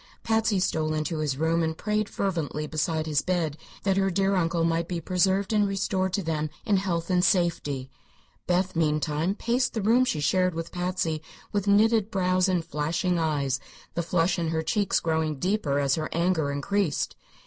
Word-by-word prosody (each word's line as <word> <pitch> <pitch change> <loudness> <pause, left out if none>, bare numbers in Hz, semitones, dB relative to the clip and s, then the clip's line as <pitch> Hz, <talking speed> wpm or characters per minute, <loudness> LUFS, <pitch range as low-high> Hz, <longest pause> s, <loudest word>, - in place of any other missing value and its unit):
Patsy 220 -2 +2
stole 155 -3 0
into 155 +1 -2
his 145 -3 -1
room 165 +2 +1
and 160 0 -1
prayed 210 0 -1
fervently 165 -6 -2
beside 155 +1 -1
his 150 -2 +1
bed 170 -5 -1 0.3
that 195 -1 +1
her 195 0 +2
dear 195 +2 +1
uncle 170 -1 +1
might 165 0 +1
be 175 -1 -3
preserved 190 +4 +1
and 210 -1 +3
restored 190 -1 -1
to 200 - 0
them 155 -2 -1 0.2
in 205 -4 +3
health 185 -2 -1
and 180 -1 +3
safety. 165 -9 +1 0.6
Beth, 185 +1 +1
meantime, 155 +2 0
paced 245 +3 0
the 220 - 0
room 235 +5 +4
she 170 -11 -1
shared 185 +4 +2
with 165 0 -5
Patsy 175 -3 -2 0.3
with 205 -1 -1
knitted 215 +1 +4
brows 185 -2 +2
and 175 -3 0
flashing 165 +4 -1
eyes, 140 -5 0 0.3
the 170 - -1
flush 170 +1 +1
in 165 - -1
her 160 0 -1
cheeks 205 +2 +1
growing 160 -2 -1
deeper 180 -4 0
as 140 -2 +2
her 155 +1 -1
anger 170 -3 +1
increased. 165 +5 -1
175 Hz, 180 wpm, -26 LUFS, 155-195 Hz, 0.6 s, room